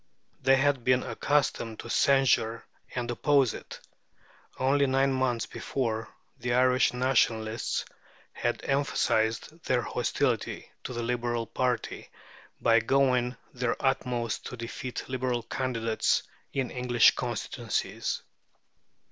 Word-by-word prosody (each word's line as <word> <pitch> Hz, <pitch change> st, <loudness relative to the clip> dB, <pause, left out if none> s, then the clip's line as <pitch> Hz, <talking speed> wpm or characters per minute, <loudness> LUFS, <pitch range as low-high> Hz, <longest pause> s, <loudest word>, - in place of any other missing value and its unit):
They 135 Hz, +1 st, +5 dB
had 135 Hz, -2 st, +2 dB
been 125 Hz, +1 st, +3 dB
accustomed 130 Hz, -6 st, 0 dB
to 120 Hz, -, -10 dB
censure 135 Hz, -5 st, +3 dB, 0.3 s
and 120 Hz, -1 st, -2 dB
oppose 140 Hz, 0 st, +3 dB
it. -, -, -9 dB, 0.8 s
Only 140 Hz, +2 st, +3 dB
nine 135 Hz, +1 st, +2 dB
months 130 Hz, -3 st, 0 dB
before, 115 Hz, -4 st, -3 dB, 0.3 s
the 120 Hz, 0 st, 0 dB
Irish 125 Hz, 0 st, +4 dB
Nationalists 115 Hz, -3 st, +1 dB, 0.5 s
had -, -, -1 dB
emphasized 135 Hz, 0 st, 0 dB
their 125 Hz, -2 st, +2 dB
hostility -, -, -1 dB
to 125 Hz, -, -4 dB
the 120 Hz, -1 st, -3 dB
Liberal 120 Hz, -1 st, -1 dB
party 125 Hz, 0 st, -2 dB, 0.5 s
by 115 Hz, 0 st, +5 dB
doing 125 Hz, 0 st, +2 dB, 0.2 s
their 125 Hz, -1 st, 0 dB
utmost 125 Hz, -4 st, -1 dB
to 125 Hz, -, -7 dB
defeat 120 Hz, +2 st, -5 dB
Liberal 125 Hz, -2 st, -1 dB
candidates 115 Hz, -3 st, 0 dB, 0.3 s
in 135 Hz, -2 st, -2 dB
English 125 Hz, -2 st, +4 dB
constituencies. -, -, -3 dB
125 Hz, 110 wpm, -28 LUFS, 115-135 Hz, 0.8 s, They